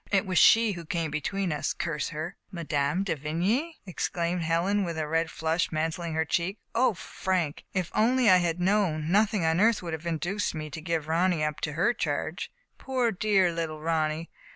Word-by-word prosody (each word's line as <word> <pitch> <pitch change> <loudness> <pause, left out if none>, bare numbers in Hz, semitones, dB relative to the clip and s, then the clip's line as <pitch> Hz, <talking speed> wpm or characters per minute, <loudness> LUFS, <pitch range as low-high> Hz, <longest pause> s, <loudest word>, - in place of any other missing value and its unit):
It 200 0 +3
was 185 -2 +2
she 225 -1 +6
who 175 -3 -6
came 165 -1 -2
between 185 +5 -2
us, 150 - -1
curse 150 -4 -2
her! 160 +4 -5
" - - -53
" - - -41
Mme. 160 -1 -1
de 190 -4 -1
Vigny! 185 - -1
" - - -44
exclaimed 175 -1 -2
Helen, 170 +5 +1
with 170 -3 -3
a 155 -1 -2
red 165 +1 0
flush 160 +3 -1
mantling 165 +1 -2
in - - -4
her 160 0 +1
cheek, 175 +6 -1 0.2
O 235 -2 +3
Frank, 175 -4 -2
if 185 -3 -1
only 245 +3 +3
I 185 -2 +8
had 175 -1 0
known, 180 -5 +1
nothing 205 -2 +3
on 160 +2 +2
earth 225 -1 +3
would 170 -2 -4
have 160 +2 -5
induced 175 +5 -1
me 155 -1 -5
to 160 - -6
give 160 -2 -2
Ronny 170 0 +2
up 150 -1 -2
into 150 - -3
her 180 +10 +2
charge. - - -3 0.3
Poor 255 -3 0
dear 195 -2 +2
little 165 -2 -3
Ronny 160 0 -1
170 Hz, 205 wpm, -27 LUFS, 160-195 Hz, 0.3 s, I